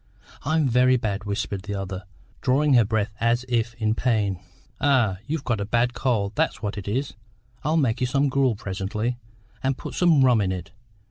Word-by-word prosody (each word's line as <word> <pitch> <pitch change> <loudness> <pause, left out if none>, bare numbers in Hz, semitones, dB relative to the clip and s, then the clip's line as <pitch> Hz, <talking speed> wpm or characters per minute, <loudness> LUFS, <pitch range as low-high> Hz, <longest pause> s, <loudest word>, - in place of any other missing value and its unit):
"I'm 155 0 +2
very 125 +1 +4
bad," 105 -3 -3
whispered 100 -1 -2
the 100 +1 -5
other, 95 -1 -5 0.4
drawing 140 +3 +3
her 120 -2 +6
breath 110 0 -1
as 120 +2 +1
if 115 -2 0
in 110 -2 0
pain. 110 -6 0 0.4
"Ay, 130 -9 +3
you've 155 -1 -2
got 120 -6 -1
a - - +1
bad 120 +3 +1
cold, 110 -8 0
that's - - 0
what 105 - -2
it 100 -2 -7
is. 130 +7 -1 0.5
I'll 155 +3 +1
make 130 -5 +1
you 125 - +2
some 140 +3 +2
gruel 135 -3 +2
presently, 105 +5 -3 0.4
and 135 0 0
put - - -7
some 160 -7 +4
rum 120 -4 +4
in 95 -2 0
it. 90 -3 -5
120 Hz, 190 wpm, -24 LUFS, 100-130 Hz, 0.5 s, her